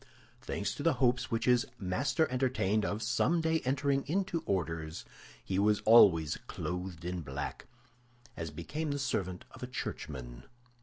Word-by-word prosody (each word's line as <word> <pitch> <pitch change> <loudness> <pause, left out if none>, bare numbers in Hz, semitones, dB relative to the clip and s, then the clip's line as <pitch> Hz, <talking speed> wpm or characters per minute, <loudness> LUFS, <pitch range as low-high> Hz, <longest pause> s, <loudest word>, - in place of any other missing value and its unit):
Thanks 100 - -2
to - - -7
the 160 -1 +3
hopes 125 0 +2
which 115 -1 -1
his 125 +1 +4
master 135 - +1
entertained 115 -5 +1
of 105 +2 -2
someday 160 +7 +2
entering 135 0 +1
into 180 +1 0
orders, 80 -4 -2 0.4
he 95 0 -1
was 105 +1 +3
always 85 -9 +6
clothed 90 -2 -5
in 90 0 -3
black, 70 -1 -5 0.7
as 80 -1 -4
became 150 - -4
the 145 - -1
servant 95 -10 -2
of - - -13
a 125 - -4
churchman. 65 - -6
110 Hz, 145 wpm, -32 LUFS, 85-135 Hz, 0.7 s, always